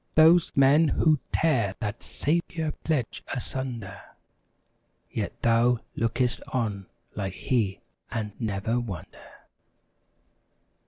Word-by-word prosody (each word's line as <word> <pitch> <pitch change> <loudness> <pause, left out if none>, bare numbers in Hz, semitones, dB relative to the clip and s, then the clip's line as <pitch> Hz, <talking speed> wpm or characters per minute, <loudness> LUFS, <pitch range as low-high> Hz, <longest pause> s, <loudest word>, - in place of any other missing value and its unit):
^ - - -41
Those 165 +2 +6
men 140 +4 +6
who'd 155 +1 +3
tear 115 -12 +2
that 105 +1 -4
Saviour 160 0 -1
pledge 145 -8 -1
asun¬ 130 -1 -3
der 95 0 -9 1.1
Yet - - -3
thou 120 +1 +4 0.2
look'st 120 +2 0
on 105 -6 -2 0.3
like 95 -2 -3
He 105 -4 0 0.3
and 110 -3 -3
never 110 +1 -1
wonder. 100 -9 -7
120 Hz, 105 wpm, -27 LUFS, 105-145 Hz, 1.1 s, Those